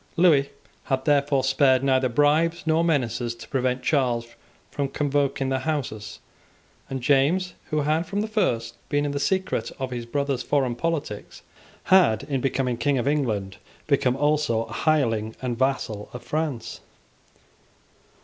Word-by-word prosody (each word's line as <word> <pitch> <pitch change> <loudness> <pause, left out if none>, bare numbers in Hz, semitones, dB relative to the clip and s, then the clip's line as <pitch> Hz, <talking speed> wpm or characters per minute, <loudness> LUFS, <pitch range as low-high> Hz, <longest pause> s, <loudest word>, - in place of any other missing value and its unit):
Lewis 155 -6 +5 0.4
had 130 -2 -1
therefore 140 -2 +2
spared 135 -1 +3
neither 130 -1 +2
bribes 150 +6 +2
nor 160 +1 +2
menaces 125 -7 0
to 115 - -12
prevent 130 -1 -1
Charles 125 -6 +1 0.4
from 140 -1 -1
convoking 140 -1 0
the 135 0 0
Houses; 120 -9 -3 0.7
and 130 -2 -4
James, 150 +8 +2 0.2
who 155 -1 +1
had 155 +4 0
from 200 +3 -1
the 215 - -2
first 120 - -1
been 145 +1 +1
in 145 - -1
the 140 - -2
secret 190 +5 -1
of 130 -1 -4
his 120 -1 -5
brother's 140 +1 -1
foreign 135 -4 0
politics, 150 -6 -4 0.4
had, 175 - +4
in 140 -2 -2
becoming 130 -2 0
King 140 +1 +1
of 125 - -1
England, 110 -10 -1 0.3
become 135 -4 +2
also 145 -5 +1
a - - -10
hireling 115 -8 +1
and 125 -2 -2
vassal 130 -6 -1
of 125 - -8
France. 150 -7 -3
135 Hz, 150 wpm, -24 LUFS, 125-150 Hz, 0.7 s, Lewis